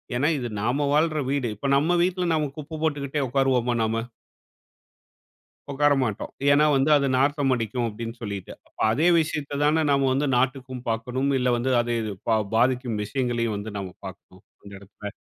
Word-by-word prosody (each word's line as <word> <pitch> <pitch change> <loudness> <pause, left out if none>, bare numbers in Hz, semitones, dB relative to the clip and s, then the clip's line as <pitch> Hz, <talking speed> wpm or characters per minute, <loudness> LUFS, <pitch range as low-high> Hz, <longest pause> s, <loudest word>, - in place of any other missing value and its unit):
ஏன்னா, 140 +5 +1
இது 120 -2 -3
நாம 130 +6 0
வாழ்ற 155 0 +2
வீடு. 140 -3 0
இப்ப 140 +7 -4
நம்ம 155 +5 +2
வீட்ல 180 0 0
நம்ம 150 -3 0
குப்ப 155 +1 -7
போட்டுக்கிட்டே 145 -2 -1
உட்காருவோமா 125 -2 +1
நாம? 115 +1 -1 1.7
உட்கார 145 +1 +3
மாட்டோம். 110 -5 -4 0.2
ஏன்னா 150 +2 +5
வந்து, 135 +3 +2
"அது 140 -1 0
நாற்றம் 140 -1 +2
அடிக்கும்." 120 +1 -2
அப்டீன்னு 115 +2 -7
சொல்லீட்டு. 100 -4 -6 0.4
அதே 150 +10 +2
விஷயத்த 145 -2 -3
தான, 155 +2 +3
நாம 140 -1 +3
வந்து 140 +2 0
நாட்டுக்கும் 130 -1 -2
பார்க்கணும். 125 +5 -1
இல்ல 125 0 +1
வந்து 130 +2 -1
அது 120 0 -2
இது 105 -2 -4 0.2
பா 110 - +4 0.2
பாதிக்கும் 125 -2 +1
விஷயங்களையும் 115 -2 -1
வந்து 105 +1 -6
நாம 95 -2 -6
பார்க்கணும், 95 0 -12 0.2
அந்த 100 - -12
இடத்துல. 100 +1 -10
130 Hz, 160 wpm, -25 LUFS, 115-145 Hz, 1.7 s, ஏன்னா